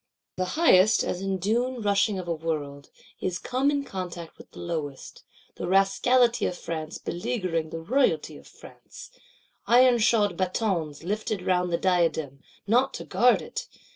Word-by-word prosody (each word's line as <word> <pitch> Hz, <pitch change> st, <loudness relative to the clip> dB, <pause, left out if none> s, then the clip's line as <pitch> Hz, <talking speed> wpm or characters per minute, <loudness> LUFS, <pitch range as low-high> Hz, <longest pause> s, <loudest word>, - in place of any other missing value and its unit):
The 185 Hz, -, 0 dB
highest, 215 Hz, -, +5 dB
as 180 Hz, -, -3 dB
in 195 Hz, -1 st, -1 dB
down 240 Hz, +7 st, -1 dB
rushing 205 Hz, 0 st, +2 dB
of 180 Hz, -2 st, -6 dB
a 170 Hz, -, 0 dB
World, 150 Hz, -3 st, -4 dB, 0.3 s
is 180 Hz, -2 st, -2 dB
come 260 Hz, +7 st, 0 dB
in 285 Hz, -1 st, 0 dB
contact 180 Hz, -7 st, -7 dB
with -, -, -14 dB
the -, -, -17 dB
lowest: 155 Hz, -5 st, -5 dB, 0.4 s
the -, -, -4 dB
Rascality 195 Hz, +6 st, +3 dB
of 180 Hz, -, -4 dB
France 160 Hz, -1 st, -5 dB
beleaguering 175 Hz, -4 st, -3 dB
the 165 Hz, 0 st, -6 dB
Royalty 260 Hz, +10 st, +1 dB
of -, -, -16 dB
France; -, -, -14 dB, 0.6 s
"ironshod 235 Hz, -5 st, +4 dB
batons" 180 Hz, -6 st, -2 dB
lifted 210 Hz, +1 st, -3 dB
round 180 Hz, -1 st, +1 dB
the 170 Hz, -, +1 dB
diadem, 165 Hz, -7 st, 0 dB, 0.3 s
not 245 Hz, +6 st, +2 dB
to -, -, -7 dB
guard 245 Hz, +1 st, +3 dB
it! -, -, -6 dB
185 Hz, 150 wpm, -26 LUFS, 170-230 Hz, 0.6 s, highest